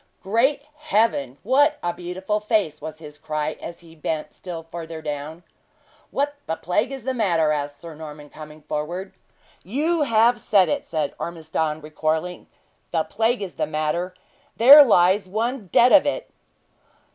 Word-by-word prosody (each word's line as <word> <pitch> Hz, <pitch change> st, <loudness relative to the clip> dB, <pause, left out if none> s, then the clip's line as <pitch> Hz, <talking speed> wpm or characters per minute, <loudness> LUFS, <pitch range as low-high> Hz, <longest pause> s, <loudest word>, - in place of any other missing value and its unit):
"Great 240 Hz, +9 st, +1 dB
Heaven! 220 Hz, -, 0 dB
what 290 Hz, +6 st, +3 dB
a 175 Hz, 0 st, -1 dB
beautiful 185 Hz, +4 st, -3 dB
face!" 210 Hz, -8 st, 0 dB
was 155 Hz, 0 st, -7 dB
his 150 Hz, -2 st, -12 dB
cry, 155 Hz, 0 st, -3 dB
as 170 Hz, +1 st, -8 dB
he 165 Hz, -1 st, -16 dB
bent 155 Hz, 0 st, -4 dB
still 170 Hz, -3 st, -7 dB
further 165 Hz, 0 st, -8 dB
down. 155 Hz, +2 st, -6 dB, 0.7 s
"What 285 Hz, +1 st, -1 dB
the 160 Hz, -, -1 dB
plague 195 Hz, +10 st, -1 dB
is 270 Hz, -3 st, -7 dB
the 260 Hz, +1 st, -1 dB
matter?" 170 Hz, -10 st, +2 dB
asked 145 Hz, -1 st, -3 dB
Sir 170 Hz, -1 st, -9 dB
Norman, 150 Hz, -1 st, -10 dB
coming 155 Hz, 0 st, -12 dB
forward. 165 Hz, +6 st, -4 dB, 0.5 s
"You 305 Hz, -, 0 dB
have 235 Hz, -2 st, +3 dB
said 195 Hz, -4 st, +3 dB
it," 285 Hz, -1 st, -1 dB
said 155 Hz, -3 st, -2 dB
Ormiston, 160 Hz, -2 st, -3 dB
recoiling. 155 Hz, +3 st, -3 dB, 0.4 s
"The 165 Hz, -2 st, 0 dB
plague 225 Hz, +3 st, 0 dB
is 185 Hz, -, -6 dB
the -, -, -1 dB
matter. 155 Hz, +4 st, -2 dB, 0.4 s
There 280 Hz, +6 st, +10 dB
lies 190 Hz, -4 st, +3 dB
one 225 Hz, +2 st, -2 dB
dead 245 Hz, +7 st, +5 dB
of 290 Hz, -1 st, +6 dB
it!" -, -, -2 dB
175 Hz, 155 wpm, -23 LUFS, 155-230 Hz, 0.7 s, There